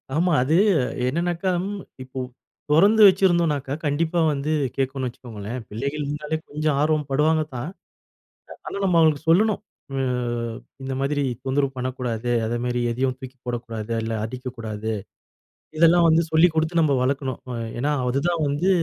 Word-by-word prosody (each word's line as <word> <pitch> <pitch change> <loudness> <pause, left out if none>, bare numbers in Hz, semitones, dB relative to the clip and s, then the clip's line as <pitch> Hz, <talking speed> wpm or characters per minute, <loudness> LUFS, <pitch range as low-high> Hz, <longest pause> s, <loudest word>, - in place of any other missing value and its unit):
ஆமா. 175 +3 +2
அது 150 +5 +2 0.5
என்னன்னாக்கா, 170 +6 0 0.5
இப்போ 130 +1 -7 0.5
தொறந்து 200 +8 +5
வச்சிருந்தோன்னாக்கா, 170 -8 +2
கண்டிப்பா 160 +4 +1
வந்து 145 +2 -2 0.2
கேக்குன்னு 135 -1 -1
வச்சுக்கோங்களேன். 115 -1 -7
பிள்ளைகள் 140 +7 -3
இருந்தாலே 150 +2 -3
கொஞ்சம் 150 0 0
ஆர்வம் 150 -1 +1
படுவாங்க 155 +3 +3
தான். 125 +6 -4 1.0
ஆனா, - - -5
நம்ம 180 -3 +2
அவுங்களுக்கு 155 -1 +3
சொல்லணும். 210 +5 +4 0.4
ஆ - - 0 0.8
இந்த 135 0 -3
மாதிரி 145 +1 0 0.2
தொந்தரவு 135 +1 +1
பண்ணக்கூடாது. 125 -2 -3 0.2
அதேமாரி 120 +2 -1
எதையும் 130 +2 0
தூக்கி 130 -1 -10
போடக்கூடாது. 115 -2 -4
இல்ல 115 0 -2
அடிக்கக்கூடாது. 115 -3 -5 0.9
இதெல்லாம் 170 +1 +6
வந்து 165 +1 +4
சொல்லிக் 160 +1 +5
குடுத்து 160 +2 +1
நம்ம 145 -3 +3
வளர்க்கணும். 135 -1 -1
அ - - -3 0.2
ஏன்னா 145 +4 +1 0.2
அதுதான் 155 +6 0
வந்து 145 +7 +1
140 Hz, 130 wpm, -23 LUFS, 125-160 Hz, 1.0 s, இதெல்லாம்